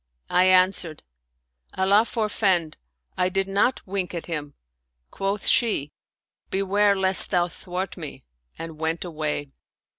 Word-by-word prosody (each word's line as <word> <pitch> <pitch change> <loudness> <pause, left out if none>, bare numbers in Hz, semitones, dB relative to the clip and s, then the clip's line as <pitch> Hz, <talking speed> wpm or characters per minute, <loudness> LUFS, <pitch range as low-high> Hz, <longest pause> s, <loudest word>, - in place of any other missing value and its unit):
" 60 - -42
I 180 +1 +5
answered, 185 -4 +3 0.4
" 60 0 -27
Allah 200 +4 +4
forfend! 200 -8 0 0.4
I 180 - +2
did 195 +1 0
not 200 +6 +1
wink 185 -2 -2
at 170 - -5
him." 150 -4 -5 0.6
Quoth 195 +1 -2
she, 180 - +3 0.3
" - - -55
Beware 200 +1 +2
lest 190 -1 +1
thou 175 -1 +2
thwart 180 +2 -5
me 155 - -8
"; 60 +1 -42
and 165 -1 -8
went 160 +2 -1
away. 150 -4 -3
180 Hz, 145 wpm, -24 LUFS, 155-195 Hz, 0.6 s, I